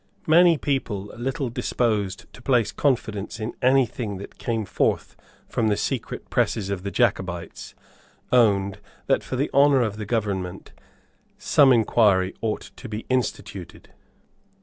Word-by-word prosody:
Many 170 Hz, +1 st, +6 dB
people 120 Hz, -9 st, -2 dB
little 130 Hz, +2 st, -3 dB
disposed 105 Hz, -5 st, -1 dB
to -, -, -13 dB
place 120 Hz, -4 st, +2 dB
confidence 110 Hz, -7 st, -1 dB
in 110 Hz, +1 st, -4 dB
any 130 Hz, +1 st, +4 dB
thing 110 Hz, -3 st, -5 dB
that 100 Hz, -, -11 dB
came 115 Hz, -2 st, -2 dB
forth -, -, -1 dB, 0.3 s
from 115 Hz, -, 0 dB
the 105 Hz, -1 st, +1 dB
secret -, -, -3 dB
presses 100 Hz, -3 st, 0 dB
of 95 Hz, -2 st, -3 dB
the 100 Hz, -, -4 dB
Jacobites 90 Hz, -3 st, -2 dB, 0.6 s
owned 100 Hz, -5 st, +3 dB, 0.3 s
that, -, -, +1 dB
for -, -, -4 dB
the 140 Hz, +4 st, -1 dB
honour 140 Hz, -2 st, +5 dB
of 105 Hz, -2 st, -3 dB
the 105 Hz, -2 st, -6 dB
government, 100 Hz, -5 st, -3 dB, 0.7 s
some 140 Hz, -2 st, +4 dB
inquiry 105 Hz, -5 st, +3 dB
ought 110 Hz, -2 st, -3 dB
to 125 Hz, -, -9 dB
be 105 Hz, +1 st, -5 dB
instituted. 125 Hz, -4 st, -3 dB
110 Hz, 140 wpm, -24 LUFS, 100-130 Hz, 0.7 s, Many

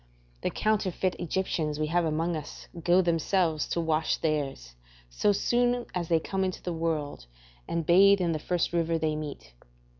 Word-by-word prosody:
The -, -, 0 dB
counterfeit 195 Hz, -3 st, 0 dB
Egyptians 160 Hz, -4 st, -2 dB
we 155 Hz, -, +1 dB
have 170 Hz, +2 st, +1 dB
amongst 165 Hz, +2 st, 0 dB
us 150 Hz, -2 st, -8 dB, 0.2 s
go 180 Hz, +2 st, +4 dB
themselves 165 Hz, -1 st, +1 dB
to -, -, -2 dB
wash 160 Hz, -1 st, +1 dB
theirs, 140 Hz, -, -2 dB, 0.4 s
so 205 Hz, -, +2 dB
soon 245 Hz, +4 st, +1 dB
as 175 Hz, -2 st, -2 dB
they 165 Hz, -1 st, +3 dB
come 190 Hz, +4 st, -2 dB
into 185 Hz, -1 st, -3 dB
the 175 Hz, -, -3 dB
world, 160 Hz, -, -3 dB, 0.4 s
and 170 Hz, -1 st, -2 dB
bathe 195 Hz, +4 st, +6 dB
in 175 Hz, -2 st, +1 dB
the 155 Hz, -, -1 dB
first 175 Hz, +2 st, -1 dB
river 165 Hz, -1 st, +1 dB
they 155 Hz, -1 st, -1 dB
meet. 150 Hz, -, -7 dB
165 Hz, 170 wpm, -28 LUFS, 155-185 Hz, 0.4 s, bathe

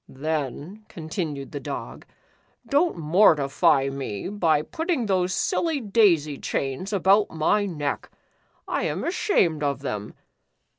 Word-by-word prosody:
"Then," 155 Hz, -, -4 dB
continued 155 Hz, -4 st, -5 dB
the 145 Hz, -, -5 dB
Dog, -, -, -7 dB, 0.6 s
"don't 295 Hz, -, +2 dB
mortify 150 Hz, -5 st, +3 dB
me 135 Hz, -, -5 dB
by 165 Hz, -7 st, +1 dB
putting 320 Hz, -, -2 dB
those 185 Hz, -3 st, +1 dB
silly 325 Hz, -, 0 dB
daisy 190 Hz, -, +2 dB
chains 135 Hz, +9 st, -3 dB
about 200 Hz, +1 st, +3 dB
my 200 Hz, +6 st, +1 dB
neck. 150 Hz, -6 st, -3 dB, 0.6 s
I -, -, -1 dB
am -, -, -2 dB
ashamed 185 Hz, -, +1 dB
of 140 Hz, -1 st, -1 dB
them. 105 Hz, -7 st, -5 dB
160 Hz, 115 wpm, -24 LUFS, 140-205 Hz, 0.6 s, mortify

